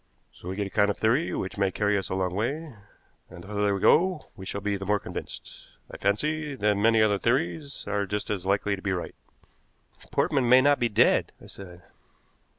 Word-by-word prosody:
So 90 - -10
we 95 - -4
get 100 0 -2
a 100 - -7
kind 105 0 +3
of 105 - -2
theory 125 +9 +1
which 95 +1 -4
may 100 -1 +2
carry 105 +1 0
us 95 - -2
a - - -2
long 95 -1 -1
way, 140 - -3 0.6
and 85 - -11
the - - -13
further 105 -1 0
we - - -3
go 180 - +2
we 95 -3 -9
shall 100 - -4
be 100 0 -2
the 95 - -5
more 105 +2 +1
convinced, - - -9 0.2
I - - -8
fancy, 150 +9 -1
that 105 -4 +2
many 110 +2 +4
other 105 -2 +2
theories 140 - -1
are 100 -1 -1
just 105 +2 -3
as 100 -4 -3
likely 100 +1 0
to 95 - -11
be 100 -1 -1
right." 90 - -4 1.0
"Portman 130 -4 +1
may 130 +1 +8
not 145 +2 +3
be 120 - +1
dead," 105 - +3
I - - -15
said. 90 -3 -12
105 Hz, 215 wpm, -26 LUFS, 100-125 Hz, 1.0 s, may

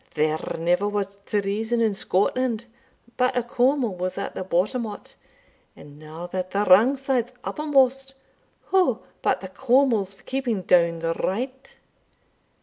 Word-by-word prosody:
There 155 +1 +1 0.2
ne'er 175 +4 +1
was 200 -1 -3
treason 210 +3 -1
in 225 -3 +2
Scotland 230 +5 0 0.5
but 250 0 +1
a 245 - +1
Cawmil 245 -1 +1
was 180 +1 -3
at - - -4
the - - -4
bottom 190 +7 0
o't; 205 - -10 0.6
and 145 0 -14
now 155 +3 -8
that 185 +1 -4
the 200 +2 0
wrang 225 +9 +6
side's 255 -2 -1
uppermost, 270 -3 +1 0.6
wha 360 -12 +4 0.2
but - - +1
the 190 - -6
Cawmils 235 -2 +2
for - - -23
keeping 250 -7 -2
down 170 -1 +3
the 165 0 -1
right? 255 +10 -4
210 Hz, 145 wpm, -24 LUFS, 185-255 Hz, 0.6 s, wrang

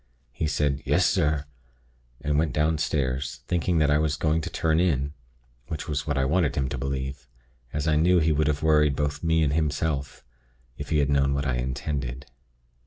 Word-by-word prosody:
He 75 +5 -2
said, 75 -2 0
'Yes, - - +2
sir,' 75 -1 +1 0.8
and 75 0 +1
went 80 -4 0
downstairs, 70 -3 -1
thinking 90 0 +1
that 75 -2 +3
I 75 - +4
was 75 -1 +1
going 80 +2 +1
to - - -4
turn 80 0 +1
in, 70 -5 +1 0.5
which 80 - -5
was 75 -1 -2
what 75 -1 0
I 65 - +2
wanted 75 0 +1
him 65 -2 0
to 65 - -4
believe, 65 0 -4 0.4
as 75 +1 -2
I 75 -1 +3
knew 90 +4 +4
he 80 -1 +3
would 75 0 +1
have 75 0 -1
worried 75 -2 +4
both 75 +1 -2
me 80 -1 +3
and 70 -1 +1
himself, 75 -3 -1 0.5
if - - -7
he 75 - +2
had 70 -1 +2
known 70 -1 +2
what 70 +1 -1
I 65 -3 0
intended. 65 0 -3
75 Hz, 190 wpm, -26 LUFS, 70-80 Hz, 0.8 s, I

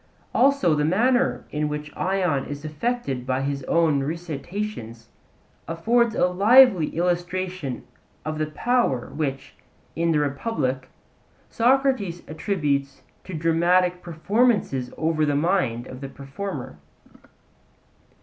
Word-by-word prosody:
Also, 275 - +4
the 150 -1 +1
manner 245 - +2
in 150 0 -1
which 150 0 -6
Ion 180 -7 0
is 145 +1 -7
affected 155 - -2
by 130 0 0
his 140 0 -2
own 160 -4 +2
recitations 160 - -5 0.6
affords 225 +8 +1
a - - +3
lively 200 - +6
illustration 175 -4 -2 0.4
of 155 0 -3
the 155 - 0
power 155 - 0
which, 135 -3 -3 0.4
in 170 +1 +1
the 155 - +2
Republic, 140 - -2 0.6
Socrates 240 -8 +1
attributes 150 -5 -2 0.2
to 185 - -6
dramatic 175 +3 +2
performances 175 - 0
over 160 -1 +1
the 145 -1 +1
mind 145 -7 +1
of 130 +1 -10
the 135 - -6
performer. 135 - -7
165 Hz, 110 wpm, -24 LUFS, 140-195 Hz, 0.6 s, lively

